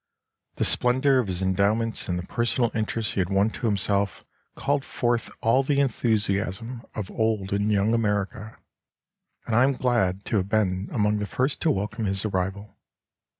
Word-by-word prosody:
The - - 0
splendour 130 +2 +3
of 120 - 0
his 95 0 -3
endowments 100 +4 +1
and 90 -2 -1
the 90 - -5
personal 120 +1 0
interest 110 0 -2
he - - -2
had 90 -1 0
won 100 +2 +2
to 120 - -3
himself 100 -1 0 0.3
called 140 -1 0
forth 120 -4 -1
all 115 +4 +4
the 140 +1 +1
enthusiasm 110 -2 0
of 105 -4 -4
old 110 -4 0
and 100 +1 +1
young 105 +2 +2
America, 105 0 -1 0.9
and 115 - -1
I 120 - +6
am 135 +1 +3
glad 110 -7 0
to 110 - 0
have 95 0 -1
been 100 -2 0
among 105 -1 +1
the 105 - -3
first 130 +6 -1
to 165 - +2
welcome 105 0 -1
his 95 +1 -1
arrival. 100 +1 -3
110 Hz, 170 wpm, -25 LUFS, 100-120 Hz, 0.9 s, I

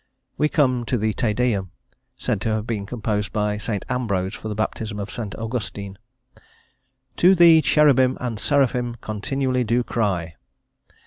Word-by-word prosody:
We 150 - +1
come 130 -6 +2
to 125 - 0
the 110 0 0
Te 110 0 0
Deum, 105 -4 0 0.5
said 100 - -1
to 115 - -1
have 110 0 -1
been 105 -4 -3
composed 105 -3 -2
by 105 -1 0
S. 105 - -6 0.2
Ambrose 100 -7 -1
for - - -7
the 105 - -3
baptism 110 0 -3
of 100 0 -5
S. 100 - -8 0.2
Augustine: 105 -4 -5 1.2
"To 185 +2 +6
thee 165 -2 +7
cherubin 135 -5 +4
and 120 -4 -4
seraphin 125 -3 +1
continually 130 +5 -1
do 120 +2 +1
cry." 90 - -2
115 Hz, 150 wpm, -22 LUFS, 105-125 Hz, 1.2 s, thee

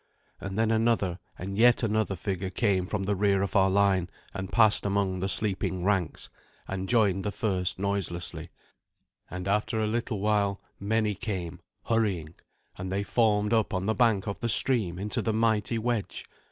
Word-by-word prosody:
And 95 +1 -6
then 110 0 +2
another 110 -5 +1 0.2
and 100 +3 -5
yet 120 +1 +5
another 110 -2 0
figure 95 +1 -3
came 95 -2 0
from 100 -1 -2
the 100 +1 0
rear 100 0 +2
of 100 - -4
our 95 -1 +4
line, 95 -2 +2 0.2
and 95 -1 -6
passed 110 -3 +4
among 100 -2 0
the 95 +2 -1
sleeping 95 -2 +2
ranks, 95 -4 -1 0.4
and 95 0 -4
joined 100 -5 +2
the 105 - -2
first 95 -6 +1
noiselessly; 90 -4 -2 0.8
and 90 +2 -6
after 105 +3 0
a 110 - +1
little 110 0 -2
while 100 -1 +1 0.2
many 105 +1 0
came, 90 -4 -5 0.2
hurrying, 95 -9 -1 0.5
and 95 0 -5
they 100 +1 -1
formed 105 0 +1
up 110 -2 +1
on 95 +1 -2
the 110 - +1
bank 110 -5 +2
of 100 - -4
the 120 - -2
stream 110 -7 +3
into 100 +2 -2
the 110 - -1
mighty 110 0 +1
wedge. 115 -2 -2
100 Hz, 170 wpm, -27 LUFS, 95-110 Hz, 0.8 s, yet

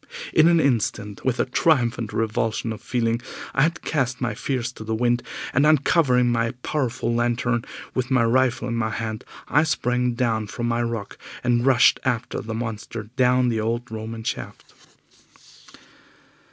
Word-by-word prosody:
In 160 +1 +6
an 170 -1 +5
instant, 110 -7 0
with 130 -2 0
a - - +3
triumphant 120 - +1
revulsion 115 0 -1
of 105 - -10
feeling, 115 -1 0 0.3
I 135 - +2
had 165 +4 +1
cast 130 -5 -1
my 120 -3 -1
fears 125 +1 -2
to 110 - -10
the 110 +1 -2
wind, 120 +1 +1 0.3
and 140 - +3
uncovering 140 -4 +4
my 115 0 0
powerful 130 -5 -1
lantern, 120 0 0 0.3
with 130 0 -1
my 130 -3 +3
rifle 125 +1 +2
in 120 - -2
my 115 -1 0
hand, 110 0 -4 0.2
I 150 - +4
sprang 125 -5 0
down 115 -3 0
from 120 +2 -3
my 120 0 0
rock 115 -3 -4 0.2
and 120 -1 +2
rushed 130 -3 +5
after 120 -1 -1
the 110 -2 -5
monster 110 -1 -5
down 125 -1 +3
the 115 -2 0
old 115 +2 -2
Roman 110 +1 -6
shaft. - - -6
120 Hz, 160 wpm, -23 LUFS, 115-125 Hz, 0.3 s, In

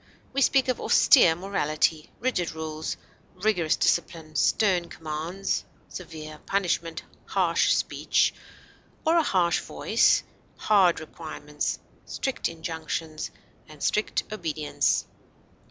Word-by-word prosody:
We 275 - 0
speak 270 0 +4
of 255 - -1
austere 175 - +6
morality, 160 -4 0
rigid 225 -10 -1
rules, 155 0 -4 0.4
rigorous 180 -5 +1
discipline, 160 -2 0
stern 180 +1 +2
commands, 165 +5 -3 0.3
severe 155 -3 -8
punishment, 170 -4 -1 0.2
harsh - - +2
speech - - +1 0.7
or 325 +1 +4
a - - +6
harsh 180 - +2
voice, - - +2 0.3
hard 195 -5 +4
requirements, 150 -1 -5 0.3
strict 265 - -2
injunctions, 160 -1 -4 0.4
and 150 -1 -10
strict 210 - +1
obedience. 160 -7 0
165 Hz, 100 wpm, -26 LUFS, 155-195 Hz, 0.7 s, austere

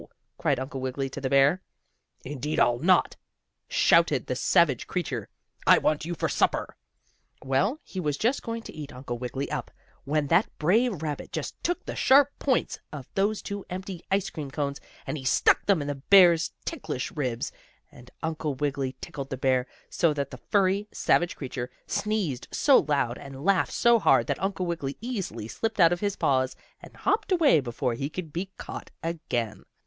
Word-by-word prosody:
cried - - 0
Uncle 135 0 -5
Wiggily 130 +1 -3
to 140 - -6
the 130 - -1
bear. 140 +6 +4 0.6
"Indeed 145 +2 -3
I'll 120 0 +3
not!" 180 +5 +3 0.5
shouted - - +3
the - - -2
savage - - +3
creature. - - -3 0.4
"I - - +8
want 155 0 +1
you 175 +1 -3
for - - -1
supper." - - 0 0.7
Well, 190 - +1
he 190 - -7
was 150 -5 -1
just 240 - +1
going 230 0 -5
to - - -9
eat 150 -2 -7
Uncle 125 -2 -6
Wiggily 130 +2 -4
up, - - -3 0.3
when 150 +1 0
that 175 +6 +4
brave 195 +2 +2
rabbit 150 -2 -4
just - - -5
took 350 +1 -1
the - - -5
sharp 280 +1 +5
points 265 -3 0
of 140 -4 -8
those 205 +2 0
two 200 -1 -5
empty 185 -1 -6
ice 195 0 0
cream 150 -4 -6
cones, 140 0 -3 0.2
and 155 - -3
he - - -9
stuck 130 - +3
them 190 -7 +3
in - - -6
the 145 - -1 0.2
bear's 175 -4 +7
ticklish 260 - -4
ribs, 125 -6 -2 0.4
and 125 0 -15
Uncle 155 -3 -2
Wiggily 135 -2 -2
tickled 140 -2 -6
the 135 - -4
bear 130 -1 +1 0.2
so 165 -4 +1
that 140 -2 -3
the - - -7
furry, 200 +1 +2
savage 175 0 +1
creature 125 -2 -5 0.2
sneezed 200 - -2 0.2
out 260 - +6
loud, 125 -5 +1
and 140 +1 -9
laughed 195 -1 +2
so 235 -1 +4
hard - - +4
that - - -2
Uncle 190 -1 -1
Wiggily 160 -6 -3
easily 220 - -4
slipped 225 - -3
out 170 -1 +6
of 175 - -3
his 205 -1 -1
paws, 130 -1 +1 0.3
and - - -13
hopped 415 +1 0
away 320 - +5
before 125 -1 -2
he 135 +5 -3
could 160 -2 -7
be 185 +3 -3
caught - - -7
again. 120 - -3
155 Hz, 180 wpm, -27 LUFS, 135-195 Hz, 0.7 s, I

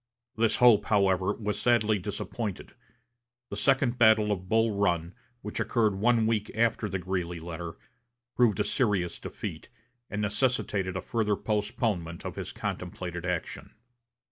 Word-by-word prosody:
This 115 0 +2
hope, 115 -4 +6
however, 95 -2 +2
was 105 -1 -3
sadly 110 -3 +3
disappointed. 105 +1 -5 0.8
The - - -3
second 125 +2 +2
battle 110 -2 +5
of 95 -2 -3
Bull 115 0 +3
Run, 85 -4 0 0.3
which 105 - -4
occurred 110 -4 +2
one 115 +3 +2
week 110 -1 0
after 115 -1 +1
the 95 - -1
Greeley 90 -2 -3
letter, 85 0 -7 0.6
proved 115 -6 +3
a - - +3
serious 100 - 0
defeat, - - -7 0.4
and 105 - -3
necessitated 105 -3 0
a - - -3
further 105 +1 0
postponement 105 -5 -2
of - - -5
his - - -5
contemplated 90 -1 -5
action. 90 +3 -4
105 Hz, 140 wpm, -28 LUFS, 95-110 Hz, 0.8 s, hope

